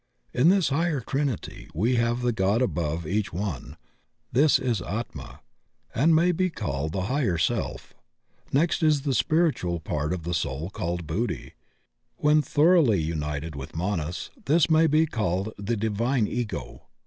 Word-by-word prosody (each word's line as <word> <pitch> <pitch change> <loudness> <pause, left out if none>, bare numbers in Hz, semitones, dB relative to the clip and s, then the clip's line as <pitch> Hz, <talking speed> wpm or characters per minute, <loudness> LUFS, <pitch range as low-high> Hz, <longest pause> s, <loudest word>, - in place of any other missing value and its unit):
In 145 +7 +4
this 190 -5 +3
higher 155 +1 +1
Trinity, 135 - -3
we 115 +9 +2
have 120 +1 0
the 120 - +2
God 105 +3 +1
above 85 -5 -2
each 100 +5 -1
one; 90 -6 -5 0.5
this 145 +5 +5
is 120 -7 -1
Atma, 110 +7 -6 0.5
and 160 +6 +4
may 170 +3 +4
be 185 +2 +1
called 80 - -3
the 95 +2 -2
Higher 120 - 0
Self. 80 - -2 0.6
Next 165 +6 +2
is 155 -3 +3
the 140 -2 0
spiritual 125 - +1
part 75 -1 -2
of 90 -3 -3
the 85 +2 -3
soul 80 +1 -2
called 85 -2 -3
Buddhi; 100 +11 -3 0.6
when 150 +1 +4
thoroughly 150 - +4
united 75 -1 -3
with 70 +3 -8
Manas 85 -2 -3
this 160 +2 +3
may 160 +1 +5
be 155 +2 +4
called 105 - -2
the 110 +3 -1
Divine 110 +3 0
Ego. 120 0 -5
110 Hz, 150 wpm, -26 LUFS, -, 0.6 s, this